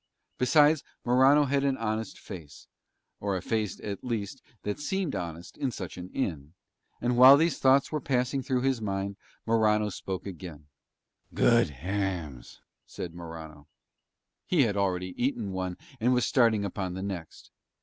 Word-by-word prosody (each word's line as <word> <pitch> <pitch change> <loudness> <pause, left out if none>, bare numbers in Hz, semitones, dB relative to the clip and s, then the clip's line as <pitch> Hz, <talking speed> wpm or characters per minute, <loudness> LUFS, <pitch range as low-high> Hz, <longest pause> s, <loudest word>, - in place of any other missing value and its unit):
Besides 150 +3 +4 0.2
Morano 135 +4 +5
had 140 0 +1
an 135 -1 +1
honest 110 0 -3
face, 85 -8 -10 0.5
or 100 -2 -1
a - - -5
face 110 -2 -1
at 100 -2 -5
least 115 0 -3 0.2
that 105 +5 -3
seemed 175 +2 -2
honest 85 -2 -6
in 135 - 0
such 95 -7 -6
an 90 0 -8
inn: 80 - -3 0.5
and 120 0 0
while 130 +3 +10
these 165 0 +1
thoughts 135 +1 +4
were 150 -2 -2
passing 130 +1 0
through 130 -1 0
his 130 -3 0
mind 100 -1 -2 0.3
Morano 110 -2 +3
spoke 95 -2 -5
again: 85 -5 -8 0.7
"Good 115 -7 +4
hams," 80 -4 -4 0.3
said 85 - -6
Morano. 80 -3 -9 0.8
He 165 -6 +4
had 105 -4 0
already 90 -2 -1
eaten 115 -6 -1
one 95 -1 -3 0.2
and 125 +3 +3
was 125 - +2
starting 115 -5 +3
upon 95 -1 -4
the 95 - -4
next. 90 -5 -7
105 Hz, 150 wpm, -28 LUFS, 90-130 Hz, 0.8 s, while